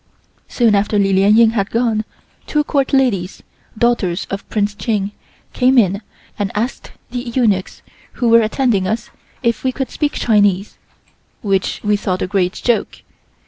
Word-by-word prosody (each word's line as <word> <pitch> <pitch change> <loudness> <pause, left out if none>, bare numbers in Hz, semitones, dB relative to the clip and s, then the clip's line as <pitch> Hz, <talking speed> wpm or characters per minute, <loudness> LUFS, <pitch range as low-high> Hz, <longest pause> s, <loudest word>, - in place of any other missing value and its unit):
Soon 235 -4 +2
after 205 +1 +1
Li 195 -1 +2
Lien 200 +3 +4
Ying 230 -1 +6
had 200 -3 -1
gone, 225 -2 0 0.4
two 300 0 +1
court 275 -2 0
ladies, 230 -10 0 0.3
daughters 215 -7 +1
of 195 0 -5
Prince 205 -1 0
Ching, 205 -2 -2 0.4
came 255 +1 +3
in 200 -3 +3 0.4
and 200 -2 -1
asked 230 +5 -3 0.2
the 245 - -3
eunuchs 235 -6 -1 0.3
who 245 - -1
were 230 0 +6
attending 220 -4 +1
us 225 +3 -3 0.3
if 235 -2 0
we 260 - +1
could 260 -1 -4
speak 295 -1 -1
Chinese, 205 -3 +1 0.6
which 195 -2 -1
we 210 0 +2
thought 185 -2 -2
a - - 0
great 185 -1 0
joke. 240 -2 -1
215 Hz, 155 wpm, -17 LUFS, 195-240 Hz, 0.6 s, Ying